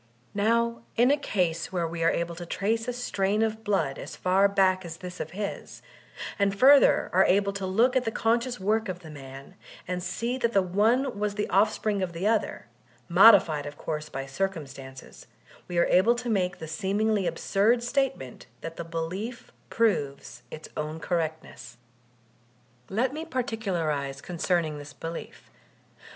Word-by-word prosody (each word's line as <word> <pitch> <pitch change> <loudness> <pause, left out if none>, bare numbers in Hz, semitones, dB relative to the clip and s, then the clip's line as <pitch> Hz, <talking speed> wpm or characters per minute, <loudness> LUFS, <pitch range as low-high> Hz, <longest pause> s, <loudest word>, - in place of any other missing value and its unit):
Now, 230 +3 +1
in 245 +3 +4
a - - +5
case 180 - -1
where 175 -3 -1
we 165 0 -4
are 165 - +5
able 170 0 -1
to 175 +1 -8
trace 225 +6 -1
a 245 - -1
strain 210 -3 0
of 220 0 -2
blood 165 -10 0
as - - -7
far 190 +2 +3
back 190 -1 +2
as 165 -2 -7
thb 180 0 -9
of - - -4
his, 200 +1 -6 0.6
and 200 0 +1
further 275 +5 +6
are 190 +2 +6
able 200 +1 +2
to 195 -1 -4
look 230 +7 +3
at 260 - +3
the 225 - -1
conscious 235 +2 0
work 215 +2 0
of 180 -1 -5
the 160 -3 -11
man, 135 -1 -11 0.3
and 180 0 -2
see 235 +7 -3
that 235 -1 0
the 195 - +5
one 220 +6 +1
was 210 -1 -1
the 210 - -1
offspring 210 +1 +2
of 180 -2 -2
the 170 +4 -4
other, 220 0 0 0.4
modified 175 -6 +6
of 145 0 -8
course 150 -1 -4
by 135 - -4
drcumstances, 135 -4 -6 0.4
we 175 - -4
are 170 - +5
able 215 +7 +4
to 240 0 -4
make 180 -4 0
the 160 - -7
seemingly 200 +3 0
ab - - -3
surd 225 +5 +2
statement 245 - -2
that 165 0 -7
the - - -4
belief 175 +9 -5 0.2
proves 140 - -1
its 155 - -9
own 155 +1 -4
correctness. 160 -7 -4 1.1
Let 245 +6 0
me 310 +2 -4
particularize 180 - -2
concerning 170 -2 -1
this 145 0 -10
belief. 165 +1 -8
190 Hz, 165 wpm, -27 LUFS, 165-225 Hz, 1.1 s, further